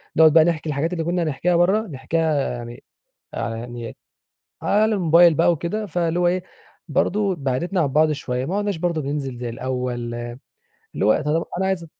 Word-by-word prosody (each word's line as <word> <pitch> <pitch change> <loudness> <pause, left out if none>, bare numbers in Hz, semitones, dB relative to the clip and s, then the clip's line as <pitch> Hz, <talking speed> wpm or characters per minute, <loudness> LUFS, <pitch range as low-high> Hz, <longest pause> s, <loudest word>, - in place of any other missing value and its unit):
نقعد 160 -1 +6
بقى 160 -1 +7
نحكي 165 -2 -1
الحاجات 150 +5 -1
اللي 165 -2 -2
كنا 175 +1 0
هنحكيها 165 +4 0
بره 195 +6 +2
نحكيها 150 +1 -1
يعني 120 +1 -8 0.5
على 115 -1 -3
يعني 120 0 -7 0.7
على 215 +1 +2
الموبايل 170 -1 +5
بقى 170 +3 +3
وكده. 170 +7 -2
فاللي 170 -2 -1
هو 175 - +3
إيه 180 +1 0 0.4
برضه 195 +5 +1
بعدتنا 165 +6 -1
عن 145 - +2
بعض 155 +3 +3
شوية 130 -3 -3
ما 190 +6 -2
عُدناش 205 -3 -1
برضه 170 -2 -1
بننزل 135 -3 -4
زي 120 -1 -4
الأول، 125 -1 -3 0.8
اللي - - -1
هو - - +3
طب 155 +3 0
أنا 190 - 0
عايز 190 -3 -1
160 Hz, 175 wpm, -22 LUFS, 135-175 Hz, 0.8 s, بقى